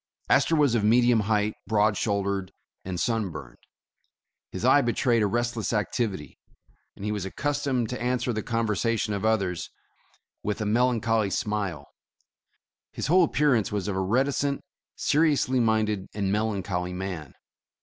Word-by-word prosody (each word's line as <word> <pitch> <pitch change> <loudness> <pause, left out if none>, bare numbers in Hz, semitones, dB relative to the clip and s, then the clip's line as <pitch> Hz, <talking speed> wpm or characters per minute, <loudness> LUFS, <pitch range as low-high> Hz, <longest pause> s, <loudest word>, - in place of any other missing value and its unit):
Astor 165 - +4
was 145 -5 +3
of 115 -3 +1
medium 120 +2 +4
height, 105 0 +1
broad 105 0 +2
shouldered 100 -2 -1 0.3
and 90 -2 -4
sun 115 -3 0
burned. - - -10 0.9
His 95 +5 -4
eye 140 +3 +6
betrayed 120 -1 +1
a 105 - +3
restless 120 0 -1
activity, 105 - -2 0.6
and 100 - -8
he 105 - -1
was 105 -3 -2
accustomed 140 +3 -1
to 125 - -5
answer 125 0 0
the 110 - -2
conversation 115 -1 -1
of 100 - -3
others 95 -6 0 0.7
with 105 +1 -3
a 110 - -2
melancholy 115 -1 +2
smile; 105 -2 -2 1.1
his - - -4
whole 180 +6 +5
appearance 140 -9 +2
was 105 -1 -2
of 100 - -2
a 95 - 0
reticent, 135 +7 0 0.3
seriously 145 -4 +2
minded 110 -4 +1
and 100 -2 -1
melancholy 100 -4 -1
man. 90 -6 -6
110 Hz, 140 wpm, -26 LUFS, 100-120 Hz, 1.1 s, eye